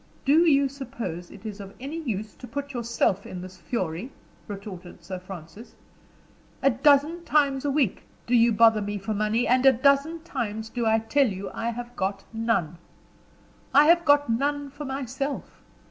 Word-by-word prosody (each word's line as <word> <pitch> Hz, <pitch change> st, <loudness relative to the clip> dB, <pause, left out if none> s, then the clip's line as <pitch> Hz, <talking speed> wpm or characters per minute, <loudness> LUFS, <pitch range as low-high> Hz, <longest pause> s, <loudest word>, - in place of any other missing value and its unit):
"Do 315 Hz, +5 st, +5 dB
you 280 Hz, -1 st, +4 dB
suppose 230 Hz, -11 st, -6 dB
it -, -, -14 dB
is 210 Hz, -1 st, -6 dB
of 195 Hz, -1 st, -9 dB
any 285 Hz, +6 st, -5 dB
use 215 Hz, -6 st, -4 dB
to 250 Hz, -, -10 dB
put 285 Hz, +1 st, -5 dB
yourself 230 Hz, -5 st, 0 dB
in 180 Hz, -, -7 dB
this 185 Hz, 0 st, -10 dB
fury?" 185 Hz, -, -3 dB, 0.4 s
retorted 195 Hz, -4 st, -9 dB
Sir 185 Hz, +1 st, -6 dB
Francis. 185 Hz, +3 st, -11 dB, 0.9 s
"A 275 Hz, -, +5 dB
dozen 295 Hz, +7 st, +3 dB
times 285 Hz, -4 st, +2 dB
a -, -, +1 dB
week 270 Hz, -8 st, +1 dB, 0.2 s
do 240 Hz, -, -2 dB
you 235 Hz, 0 st, +5 dB
bother 225 Hz, 0 st, +5 dB
me 205 Hz, 0 st, -3 dB
for 200 Hz, +2 st, -3 dB
money 215 Hz, +3 st, +1 dB
and 255 Hz, +1 st, +3 dB
a 270 Hz, -, +8 dB
dozen 280 Hz, +6 st, +2 dB
times 220 Hz, -7 st, -4 dB
do 235 Hz, -2 st, -1 dB
I 220 Hz, 0 st, +4 dB
tell 255 Hz, +5 st, +2 dB
you 195 Hz, -2 st, -5 dB
I 230 Hz, -, -2 dB
have 240 Hz, +1 st, -6 dB
got 195 Hz, +1 st, -2 dB
none. 220 Hz, -8 st, -1 dB, 1.0 s
I 290 Hz, +1 st, +8 dB
have 340 Hz, 0 st, +5 dB
got 290 Hz, -2 st, +4 dB
none 280 Hz, +4 st, -1 dB
for 290 Hz, +1 st, -7 dB
myself. 270 Hz, +1 st, -4 dB
235 Hz, 175 wpm, -26 LUFS, 205-280 Hz, 1.0 s, a